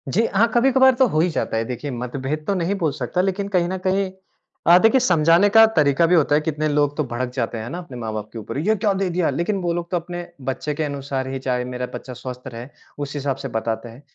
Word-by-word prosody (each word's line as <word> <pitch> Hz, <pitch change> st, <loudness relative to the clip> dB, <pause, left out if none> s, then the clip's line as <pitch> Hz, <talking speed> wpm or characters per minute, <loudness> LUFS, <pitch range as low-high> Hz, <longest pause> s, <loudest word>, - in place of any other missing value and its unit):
जी 225 Hz, +4 st, +3 dB
हाँ, 215 Hz, +4 st, +4 dB
कभी-कभार 265 Hz, +2 st, +5 dB
तो 260 Hz, +1 st, +4 dB
हो 155 Hz, -, 0 dB
ही 175 Hz, +3 st, +3 dB
जाता 150 Hz, -, -2 dB
है, 115 Hz, -, 0 dB
देखिए, 130 Hz, +4 st, -5 dB
मतभेद 130 Hz, +5 st, -4 dB
तो 200 Hz, -, +2 dB
नहीं 185 Hz, +2 st, 0 dB
बोल 160 Hz, -3 st, +2 dB
सकता 140 Hz, +7 st, -1 dB
लेकिन 195 Hz, +1 st, -1 dB
कहीं 175 Hz, -1 st, +3 dB
न 190 Hz, -, -2 dB
कहीं 190 Hz, 0 st, +1 dB, 0.6 s
अ, 170 Hz, +1 st, +9 dB
देखिए 225 Hz, +6 st, +5 dB
समझाने 175 Hz, -3 st, +4 dB
का 225 Hz, +2 st, +8 dB
तरीका 150 Hz, +1 st, +4 dB
भी 175 Hz, +2 st, +4 dB
होता 150 Hz, -3 st, +3 dB
है, 150 Hz, -, +3 dB
कितने 155 Hz, 0 st, -1 dB
लोग 145 Hz, -1 st, +1 dB
तो 150 Hz, -, +1 dB
भड़क 125 Hz, -1 st, -4 dB
जाते 120 Hz, -2 st, -2 dB
हैं 110 Hz, +2 st, -5 dB
ना, 175 Hz, -, -5 dB
अपने 170 Hz, -8 st, -8 dB
माँ-बाप 110 Hz, -2 st, -5 dB
के 115 Hz, -, -6 dB
ऊपर, 110 Hz, -, -6 dB
ये 205 Hz, +9 st, +2 dB
क्या 205 Hz, 0 st, +1 dB
दे 190 Hz, -1 st, -1 dB
दिया? 175 Hz, -1 st, 0 dB
लेकिन 170 Hz, +9 st, -1 dB
वो 175 Hz, -1 st, 0 dB
लोग 170 Hz, 0 st, -4 dB
तो 180 Hz, -, +2 dB
अपने 175 Hz, +1 st, -6 dB, 0.2 s
बच्चे 150 Hz, +3 st, -3 dB
के 155 Hz, +2 st, -2 dB
अनुसार 140 Hz, -2 st, -3 dB
ही 135 Hz, 0 st, -4 dB
चाहे 125 Hz, -1 st, -1 dB
मेरा 125 Hz, 0 st, -4 dB
बच्चा 130 Hz, -, -7 dB
स्वस्थ 125 Hz, +1 st, -8 dB
रहे, 120 Hz, -1 st, -8 dB, 0.3 s
उस 145 Hz, -1 st, -5 dB
हिसाब 140 Hz, -1 st, -1 dB
से -, -, -2 dB
बताते 110 Hz, +1 st, -3 dB
हैं। 115 Hz, +4 st, -13 dB
150 Hz, 255 wpm, -22 LUFS, 130-180 Hz, 0.6 s, अ